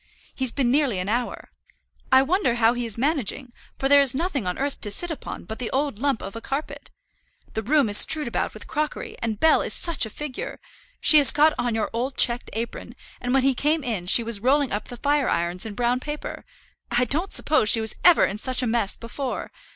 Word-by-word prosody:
He's 260 Hz, -3 st, -1 dB
been 255 Hz, -4 st, 0 dB
nearly 275 Hz, -7 st, +1 dB
an 180 Hz, +2 st, -3 dB
hour. 240 Hz, +3 st, -3 dB, 0.6 s
I 260 Hz, 0 st, +6 dB
wonder 320 Hz, -, 0 dB
how 235 Hz, 0 st, +3 dB
he 245 Hz, -1 st, -4 dB
is 220 Hz, -, -3 dB
managing, 265 Hz, -2 st, -2 dB, 0.2 s
for 270 Hz, -, 0 dB
there 285 Hz, +1 st, +6 dB
is 265 Hz, -2 st, +3 dB
nothing 285 Hz, -, -2 dB
on 180 Hz, -, -3 dB
earth 280 Hz, +1 st, -3 dB
to 210 Hz, -, -3 dB
sit 345 Hz, +12 st, -1 dB
upon 315 Hz, -, -7 dB
but 220 Hz, +5 st, -8 dB
the 245 Hz, -, -3 dB
old 275 Hz, -5 st, -2 dB
lump 275 Hz, -2 st, -1 dB
of 195 Hz, -, -8 dB
a 230 Hz, -, -7 dB
carpet. 275 Hz, +5 st, -6 dB, 0.6 s
The 220 Hz, -, -2 dB
room 280 Hz, +3 st, +2 dB
is 205 Hz, 0 st, +6 dB
strewed 305 Hz, -4 st, +3 dB
about 235 Hz, -, -3 dB
with -, -, -8 dB
crockery, 300 Hz, 0 st, -4 dB
and 220 Hz, -2 st, -3 dB
Bell 320 Hz, -, +4 dB
is -, -, -3 dB
such 330 Hz, -9 st, +1 dB
a -, -, -10 dB
figure! 280 Hz, +3 st, -7 dB, 0.4 s
She 305 Hz, -, +8 dB
has 285 Hz, -, +8 dB
got 305 Hz, +1 st, +3 dB
on 240 Hz, -2 st, -1 dB
your 220 Hz, -, -2 dB
old 250 Hz, +4 st, -3 dB
checked 240 Hz, 0 st, +2 dB
apron, 230 Hz, +2 st, -6 dB, 0.3 s
and 245 Hz, -, -3 dB
when 270 Hz, 0 st, +2 dB
he 270 Hz, 0 st, +3 dB
came 300 Hz, +4 st, 0 dB
in 210 Hz, -8 st, -4 dB
she 230 Hz, +5 st, +4 dB
was 230 Hz, -2 st, -3 dB
rolling 270 Hz, +4 st, +1 dB
up 205 Hz, -, -4 dB
the 245 Hz, -, -9 dB
fire 285 Hz, +1 st, 0 dB
irons 175 Hz, +4 st, -1 dB
in 210 Hz, -, -8 dB
brown 245 Hz, +2 st, 0 dB
paper. 295 Hz, +3 st, -7 dB, 0.4 s
I 240 Hz, +1 st, +2 dB
don't 320 Hz, -, -2 dB
suppose 300 Hz, -9 st, +3 dB
she 225 Hz, -, +5 dB
was 220 Hz, -1 st, 0 dB
ever 355 Hz, -2 st, +6 dB
in 205 Hz, -, -4 dB
such 255 Hz, +2 st, 0 dB
a -, -, -1 dB
mess 225 Hz, -3 st, 0 dB
before. 250 Hz, +3 st, -6 dB
250 Hz, 225 wpm, -23 LUFS, 225-285 Hz, 0.6 s, She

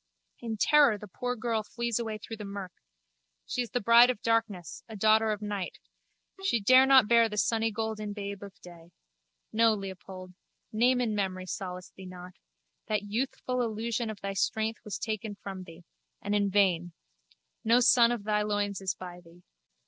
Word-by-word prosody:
In 225 Hz, -2 st, -4 dB
terror 285 Hz, -2 st, +5 dB
the 210 Hz, -, -10 dB
poor 245 Hz, +6 st, -3 dB
girl 225 Hz, -1 st, -1 dB
flees 235 Hz, +1 st, -3 dB
away 220 Hz, -2 st, -3 dB
through 225 Hz, +1 st, -8 dB
the 210 Hz, -, -7 dB
murk. 200 Hz, -2 st, -6 dB, 0.7 s
She 250 Hz, -, -2 dB
is 240 Hz, -, -4 dB
the 245 Hz, -, -1 dB
bride 235 Hz, +2 st, +7 dB
of 250 Hz, -, -1 dB
darkness, 225 Hz, -7 st, -1 dB
a 220 Hz, -, -8 dB
daughter 220 Hz, +1 st, +3 dB
of 210 Hz, 0 st, -4 dB
night. 205 Hz, -3 st, -4 dB, 0.7 s
She 310 Hz, -12 st, +2 dB
dare 255 Hz, +6 st, +6 dB
not 265 Hz, -5 st, +7 dB
bear 230 Hz, 0 st, +5 dB
the 210 Hz, -, -6 dB
sunnygolden 220 Hz, 0 st, -1 dB
babe 200 Hz, -1 st, -6 dB
of 200 Hz, -1 st, -11 dB
day. 170 Hz, -1 st, -14 dB, 0.6 s
No, 225 Hz, 0 st, +4 dB
Leopold. 190 Hz, -2 st, -8 dB, 0.4 s
Name 245 Hz, +3 st, +3 dB
and 220 Hz, -3 st, -1 dB
memory 185 Hz, -2 st, -2 dB
solace 180 Hz, -1 st, -6 dB
thee 190 Hz, -1 st, -10 dB
not. 180 Hz, 0 st, -10 dB, 0.5 s
That 210 Hz, -2 st, 0 dB
youthful 250 Hz, +1 st, -2 dB
illusion 230 Hz, 0 st, -2 dB
of 215 Hz, -2 st, -7 dB
thy 195 Hz, 0 st, -3 dB
strength 220 Hz, +3 st, -1 dB
was 210 Hz, -3 st, -5 dB
taken 215 Hz, -1 st, -4 dB
from 195 Hz, -2 st, -8 dB
thee—and 170 Hz, +4 st, -9 dB
in 200 Hz, -1 st, +2 dB
vain. 180 Hz, -4 st, +2 dB, 0.7 s
No 230 Hz, +2 st, +4 dB
son 240 Hz, -2 st, +5 dB
of 235 Hz, -4 st, -3 dB
thy 210 Hz, 0 st, +1 dB
loins 205 Hz, -1 st, -1 dB
is 190 Hz, -1 st, -2 dB
by 180 Hz, -1 st, -9 dB
thee. 170 Hz, +1 st, -19 dB
210 Hz, 170 wpm, -29 LUFS, 195-230 Hz, 0.7 s, bride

